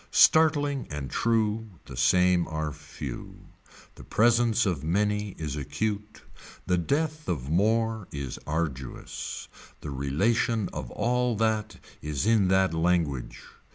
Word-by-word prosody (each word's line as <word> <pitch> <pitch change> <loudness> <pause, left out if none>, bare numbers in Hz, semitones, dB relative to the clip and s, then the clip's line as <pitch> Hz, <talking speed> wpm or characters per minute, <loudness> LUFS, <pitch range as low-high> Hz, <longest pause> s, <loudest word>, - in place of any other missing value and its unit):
Startling 145 -4 +4
and 75 -3 -5
true 110 -4 0
the 65 - -9
same 90 +7 +3
are 80 -1 -3
few. 75 0 -9 0.4
The - - -13
presence 115 0 +3
of 85 -8 -1
many 105 +4 0
is 75 -3 -4
acute. 105 +9 -3 0.4
The 90 -1 +2
death 155 - -1
of 70 -4 -2
more 110 +3 +1
is 70 -3 -5
arduous. 75 -5 -4 0.3
The 75 - -6
relation 100 - +1
of - - -5
all 125 0 0
that 110 0 0 0.3
is 75 +3 -2
in 110 -4 +4
that 95 -2 +3
language. 80 -6 0
95 Hz, 120 wpm, -27 LUFS, 75-115 Hz, 0.4 s, Startling